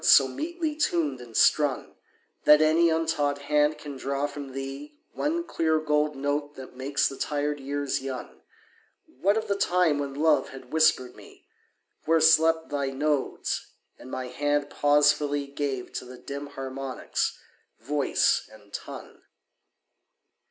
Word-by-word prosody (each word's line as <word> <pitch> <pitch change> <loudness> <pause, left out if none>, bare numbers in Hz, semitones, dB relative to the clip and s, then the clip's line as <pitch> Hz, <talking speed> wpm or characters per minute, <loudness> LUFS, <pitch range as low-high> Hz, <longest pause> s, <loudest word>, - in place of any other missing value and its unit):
so 135 - +7
metely 320 - -3
tuned 160 - 0
and 120 -2 -7
strung 145 -3 +2 0.5
That 150 0 +8
any 160 +2 +4
untaught 160 -3 0
hand 150 +1 +1
can 145 -2 -8
draw 140 +2 -2
from 140 -2 -7
thee 135 +2 -7 0.2
One 330 +3 -1
clear 160 - +1
gold 150 -1 +1
note 145 +1 -2
that 130 -1 -10
makes 135 +3 0
the 135 - -7
tired 145 0 -1
years 140 0 -2
young 130 -2 -7 0.6
What 195 +10 0
of 220 - -2
the 200 - +1
time 180 -6 +2
when 140 -1 -4
Love 150 -2 +2
had 130 0 -12
whispered 155 -6 +3
me - - -16 0.6
Where 165 +1 +4
slept 160 0 +4
thy 140 -1 -1
nodes, 145 +1 -2 0.3
and 130 - -11
my 130 0 -4
hand 145 +3 -1
pausefully 145 0 +3
Gave 140 -2 -4
to - - -5
the 125 0 -11
dim 140 +3 -7
harmonics 135 -1 -3 0.4
voice 140 +4 +1
and - - -18
tongue? - - -8
145 Hz, 140 wpm, -27 LUFS, 135-155 Hz, 0.6 s, That